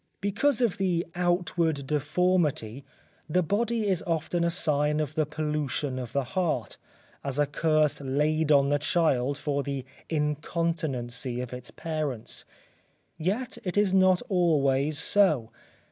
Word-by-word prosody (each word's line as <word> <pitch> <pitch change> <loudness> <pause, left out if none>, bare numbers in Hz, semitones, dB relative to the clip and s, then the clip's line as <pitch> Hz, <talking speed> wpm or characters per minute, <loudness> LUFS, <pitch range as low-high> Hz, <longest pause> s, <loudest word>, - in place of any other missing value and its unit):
Because 225 +7 +1
of 230 -7 +1
the 180 -3 +1
outward 175 -4 0
deformity, 150 -4 0 0.5
the 180 +4 +2
body 220 +5 0
is 185 -4 0
often 165 +1 0
a 170 - +2
sign 150 -2 +1
of 155 -1 -2
the 155 -1 0
pollution 150 -3 -2
of 125 -2 -6
the 140 - 0
heart, 155 - -2 0.5
as 140 -1 -3
a 145 - +4
curse 155 0 +1
laid 150 +3 +1
on 140 -1 +5
the 145 0 +2
child 145 -4 +1
for 145 -1 -1
the 140 -2 -4 0.2
incontinency 150 -5 -1
of 125 0 -5
its 125 0 -7
parents. 155 -8 -4 0.7
Yet 215 +10 -2
it 180 +1 -3
is 205 -2 +3
not 185 0 +4
always 150 - +2
so. 155 - +2
155 Hz, 135 wpm, -27 LUFS, 140-175 Hz, 0.7 s, on